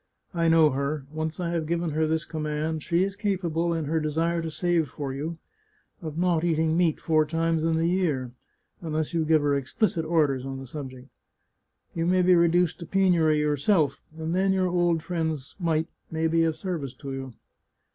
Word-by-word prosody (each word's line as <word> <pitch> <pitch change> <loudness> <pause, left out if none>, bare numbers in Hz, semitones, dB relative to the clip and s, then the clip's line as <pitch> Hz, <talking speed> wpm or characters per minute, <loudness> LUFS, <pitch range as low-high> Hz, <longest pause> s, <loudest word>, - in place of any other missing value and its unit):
I 170 -1 +1
know 160 -2 +5
her; 140 +1 -2
once 155 +1 -4
I 170 -1 -2
have 165 -2 -2
given 170 0 -1
her 155 +1 +1
this 160 +1 -1
command 155 0 -3
she 170 +3 +1
is 195 0 -2
capable, 175 -5 -1
in 165 -2 -1
her 160 +3 0
desire 165 +2 0
to 165 - -4
save 165 -1 0
for 135 0 -5
you, 155 +5 -4 0.6
of 160 -2 -6
not 175 -2 +2
eating 160 -1 +1
meat 170 -3 +2
four 155 -1 +3
times 165 +1 0
in 165 0 +2
the 165 - +1
year, 165 -9 0 0.5
unless 155 -1 -2
you 165 -1 +1
give 155 -1 +3
her 145 -1 +2
explicit 160 - 0
orders 150 -5 +1
on 135 0 -5
the 135 - -8
subject. 130 -2 -8 0.9
You 165 0 -1
may 185 0 +3
be 180 +1 +5
reduced 175 0 +3
to 170 - -8
penury 175 -5 +3
yourself, 150 0 +1 0.2
and 160 +1 -3
then 190 +1 +2
your 185 -1 +1
old 175 -2 +1
friend's 160 -6 -3
mite 160 -2 0 0.2
may 160 0 -1
be 165 0 +3
of 160 -1 0
service 155 -10 -4
to 135 +1 -7
you. 135 -2 -6
160 Hz, 190 wpm, -26 LUFS, 150-170 Hz, 0.9 s, know